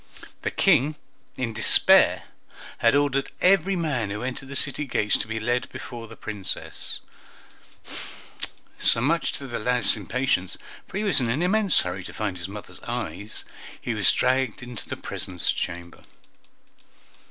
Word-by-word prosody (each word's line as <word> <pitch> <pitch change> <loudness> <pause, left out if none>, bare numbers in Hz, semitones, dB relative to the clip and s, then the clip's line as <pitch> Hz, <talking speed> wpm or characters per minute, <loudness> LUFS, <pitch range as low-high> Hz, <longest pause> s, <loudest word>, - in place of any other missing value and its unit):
The - - -1
King, 155 -5 +3 0.4
in 120 -3 -2
despair, 110 - +6 0.6
had 115 +3 +4
ordered 140 -1 +2
every 195 +1 +4
man 140 - -1
who 105 +3 -4
entered 130 +1 -5
the 140 - -6
city 140 +2 -1
gates 105 -4 +2
to - - -3
be 110 0 -3
led 120 +3 -1
before 120 -2 -7
the - - -11
Princess; 105 -3 -3 1.8
so, - - +3
much 160 +8 +1
to 140 - -5
the 120 -3 -4
lad's 125 +1 +2
impatience, 105 -3 0 0.3
for - - -5
he 210 - 0
was 200 -9 +3
in 120 -3 0
an 135 +9 +1
immense 200 +1 +4
hurry 90 +1 -4
to - - -8
find 100 -4 -3
his 85 +2 -5
mothers' 105 +1 -9
eyes, 115 -3 -4 0.3
he 120 - -2
was 100 -4 +4
dragged 130 -2 +1
into 120 -2 -6
the - - -4
presence 95 -3 -2
chamber. 85 0 -5
120 Hz, 155 wpm, -25 LUFS, 105-140 Hz, 1.8 s, despair